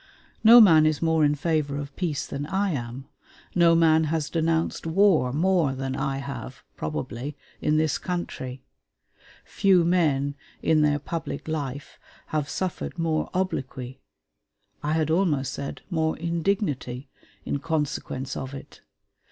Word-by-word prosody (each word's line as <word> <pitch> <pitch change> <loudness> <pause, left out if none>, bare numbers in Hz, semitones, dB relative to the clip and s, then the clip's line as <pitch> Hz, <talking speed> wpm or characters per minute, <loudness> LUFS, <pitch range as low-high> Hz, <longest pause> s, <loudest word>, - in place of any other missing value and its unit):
No 230 +2 +10
man 160 -8 +7
is 155 -2 0
more 160 -1 +3
in 145 0 +3
favor 150 -2 -1
of 145 0 -6
peace 160 -6 -2
than 140 +1 -5
I 195 +3 0
am; 130 -1 -5 0.5
no 170 -2 +5
man 160 -1 +4
has 155 -1 -2
denounced 165 0 0
war 165 -7 +3
more 165 -1 +2
than 135 0 -3
I 135 -1 -1
have, 140 0 -7
probably, 115 - -5 0.2
in 150 0 +2
this 155 -1 +1
country; 130 -8 -5 0.8
few 185 -4 +3
men 150 -6 +2 0.3
in 155 -1 +3
their 145 -1 +3
public 160 +3 -5
life 145 -3 -5 0.3
have 150 -2 -1
suffered 180 +3 -3
more 165 -2 0
obloquy 135 -8 -3 0.8
I 150 +1 -1
had 160 -1 +1
almost 155 -7 +1
said, 140 - -6
more 160 -2 0
indignity 165 - -2 0.4
in 140 - -2
consequence 145 -4 -3
of 130 +1 -5
it. 135 - -11
155 Hz, 135 wpm, -25 LUFS, 140-165 Hz, 0.8 s, No